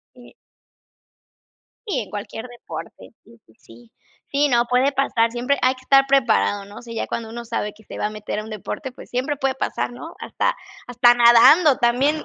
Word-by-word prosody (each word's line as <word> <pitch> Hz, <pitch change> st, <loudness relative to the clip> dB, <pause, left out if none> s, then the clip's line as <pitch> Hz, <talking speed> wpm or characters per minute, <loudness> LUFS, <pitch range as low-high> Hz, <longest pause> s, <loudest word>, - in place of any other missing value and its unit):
Sí. 245 Hz, -1 st, -17 dB, 1.5 s
Sí, 305 Hz, -11 st, -1 dB
en 210 Hz, -, -8 dB
cualquier 210 Hz, +3 st, -7 dB
deporte. 240 Hz, -1 st, -10 dB
Sí, 230 Hz, +1 st, -20 dB
sí, 110 Hz, -, -24 dB
sí. 115 Hz, 0 st, -18 dB, 0.4 s
Sí, 285 Hz, +1 st, +2 dB
no, 240 Hz, -2 st, +3 dB
puede 255 Hz, +3 st, +2 dB
pasar, 235 Hz, -4 st, +1 dB
siempre 250 Hz, +4 st, -1 dB
hay 255 Hz, +1 st, +2 dB
que 255 Hz, -, -17 dB
estar 270 Hz, +1 st, +4 dB
preparado, 245 Hz, -6 st, +2 dB
¿no?, 205 Hz, +1 st, -14 dB
o -, -, -10 dB
sea, 235 Hz, -1 st, -9 dB
ya 225 Hz, -, -3 dB
cuando 225 Hz, -1 st, -5 dB
uno 235 Hz, +1 st, -7 dB
sabe 225 Hz, -2 st, -3 dB
que 220 Hz, -, -20 dB
se -, -, -10 dB
va -, -, -1 dB
a -, -, -4 dB
meter 215 Hz, 0 st, -6 dB
a 215 Hz, -, -4 dB
un 220 Hz, -, -10 dB
deporte, 215 Hz, +5 st, -6 dB
pues, -, -, -14 dB
siempre 260 Hz, +4 st, -1 dB
puede 265 Hz, 0 st, -1 dB
pasar, -, -, -2 dB
¿no?, 320 Hz, +7 st, -10 dB
hasta -, -, -1 dB, 0.3 s
hasta 245 Hz, 0 st, +4 dB
nadando 240 Hz, +6 st, +6 dB
también. 265 Hz, +6 st, +1 dB
240 Hz, 200 wpm, -21 LUFS, 225-270 Hz, 1.5 s, nadando